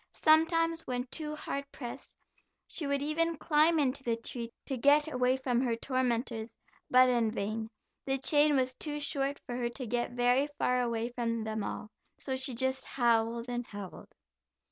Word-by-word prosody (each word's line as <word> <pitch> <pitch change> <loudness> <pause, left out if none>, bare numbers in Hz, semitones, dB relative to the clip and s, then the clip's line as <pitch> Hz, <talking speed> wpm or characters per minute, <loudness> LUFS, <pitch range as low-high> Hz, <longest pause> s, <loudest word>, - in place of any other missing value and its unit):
Sometimes, 330 +1 +3
when 245 -1 -1
too 305 -2 -3
hard 280 -2 -5
pressed, 240 -3 -8 0.5
she 305 - -3
would 280 0 0
even 330 +2 0
climb 310 +2 +3
into 275 -2 +1
the 235 -2 +1
tree, 230 0 -5
to 270 - -2
get 290 +5 +4
away 250 +1 +2
from 250 -2 0
her 240 -3 +1
tormentors, 235 -2 -1 0.3
but 255 0 +7
in 240 -3 +2
vain; 220 +1 -3 0.4
the 270 0 +1
chain 295 +2 +3
was 260 -1 +1
too 295 +2 -4
short 280 -1 -1
for 245 - -4
her 240 -1 -1
to 255 +2 -6
get 240 +1 -1
very 245 +3 +3
far 250 0 +2
away 235 -1 -1
from 230 -2 -2
them 220 -1 -3
all, 210 - -5 0.3
so 265 - -3
she 260 -1 -2
just 260 +2 0
howled 235 -1 +1
and 245 -1 -3
howled. 200 -3 -9
255 Hz, 170 wpm, -31 LUFS, 235-285 Hz, 0.5 s, but